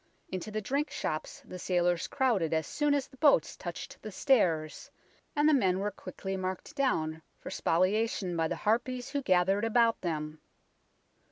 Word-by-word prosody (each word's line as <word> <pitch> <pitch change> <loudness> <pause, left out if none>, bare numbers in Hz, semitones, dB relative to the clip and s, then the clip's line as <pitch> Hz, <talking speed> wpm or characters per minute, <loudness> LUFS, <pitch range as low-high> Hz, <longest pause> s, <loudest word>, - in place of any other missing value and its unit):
Into 185 +3 -4
the 215 0 -3
drink 280 +8 -1
shops 155 0 -4
the 180 - -8
sailors 175 -1 +1
crowded 215 - +1
as 160 - 0
soon 295 -1 +1
as 280 - -1
the 265 - -19
boats 290 0 +4
touched - - -7
the 215 - -7
stairs, 175 - +1 0.5
and 295 0 +3
the 310 - +5
men 190 -9 +3
were 205 +2 -1
quickly 190 0 -6
marked 185 -1 -4
down 160 -13 0 0.2
for - - -8
spoliation 185 +1 +1
by 165 -1 +1
the - - -2
harpies 245 +4 0
who 285 -1 -1
gathered 190 -1 +2
about 230 0 +3
them. 155 -2 -3
195 Hz, 165 wpm, -30 LUFS, 175-255 Hz, 0.5 s, the